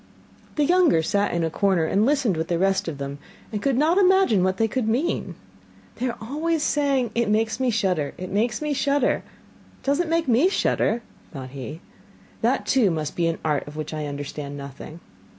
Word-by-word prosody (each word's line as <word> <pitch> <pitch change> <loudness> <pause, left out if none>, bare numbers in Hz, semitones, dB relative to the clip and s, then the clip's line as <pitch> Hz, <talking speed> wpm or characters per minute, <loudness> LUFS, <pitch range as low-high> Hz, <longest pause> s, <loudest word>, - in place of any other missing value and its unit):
The 295 - +2
younger 345 - +4
sat 200 +5 +1
in 170 -1 0
a 160 - -1
corner 190 -2 +2
and 205 +7 +2
listened 270 - +2
with 160 +1 -2
the 170 - 0
rest 195 +1 +1
of 160 -4 -4
them, 140 +1 -5 0.3
and 210 -2 -3
could 270 0 +1
not 320 +7 +3
imagine 375 - +4
what 185 0 +1
they 225 - +2
could 235 0 -2
mean. 230 - -1 0.6
'They 255 +2 -1
are 235 - -5
always 305 +7 -1
saying: 275 -6 +1
"It 235 -2 +1
makes 220 +3 +1
me 260 -1 +1
shudder, 185 -10 0
it 185 0 -6
makes 215 +6 0
me 300 -1 0
shudder!" 280 -1 +2 0.6
It - - -29
does 280 +3 +1
not 350 - +1
make 330 -1 +1
me 260 +9 +4
shudder,' 235 - +1 0.3
thought 130 -4 -7
he. 140 +4 -7 0.6
'That, - - +1
too, 245 -7 +3
must 155 -3 -3
be 170 -1 +1
an 165 - -1
art 150 -3 0
of 145 - -9
which 155 0 -5
I 155 -1 -3
understand 145 0 -6
nothing! 140 +4 -9
210 Hz, 205 wpm, -24 LUFS, -, 0.6 s, younger